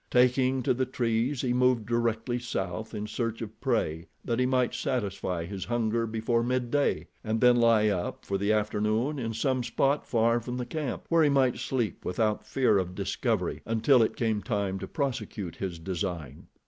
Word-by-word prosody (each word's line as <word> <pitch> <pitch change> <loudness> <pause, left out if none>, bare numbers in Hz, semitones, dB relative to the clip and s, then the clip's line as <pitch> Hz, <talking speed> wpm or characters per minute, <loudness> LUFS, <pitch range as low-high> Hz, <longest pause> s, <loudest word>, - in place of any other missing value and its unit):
Taking 125 +1 +3
to - - +3
the 130 +1 -1
trees, 120 +1 0
he 125 -2 0
moved 125 -3 +3
directly 115 +1 0
south 100 -3 -4
in 105 - -3
search 115 +1 -3
of 110 0 -10
prey, 95 - 0 0.2
that 115 0 0
he 125 - +3
might 125 -2 +1
satisfy 100 -9 -2
his 95 +1 -5
hunger 115 -1 0
before 115 +1 0
midday, 125 +3 0 0.2
and 110 0 -1
then 125 0 +6
lie 115 -2 +4
up 90 -4 -3
for 100 0 -1
the 100 +2 +1
afternoon 110 +6 0
in 115 -2 -3
some 130 +2 +1
spot 135 +5 +1
far 115 0 +3
from 125 +2 -5
the 125 - -3
camp, 145 0 -4
where 165 -1 +4
he 150 - +4
might 135 -3 +2
sleep 120 -8 -2
without 105 +3 0
fear 115 -6 +3
of 90 -1 -3
discovery - - -1
until 115 +3 +3
it 110 - +1
came 110 -3 0
time 100 -5 -2
to - - -6
prosecute 125 - -3
his 95 -3 -4
design. 85 -5 -5
115 Hz, 180 wpm, -28 LUFS, 105-125 Hz, 0.2 s, then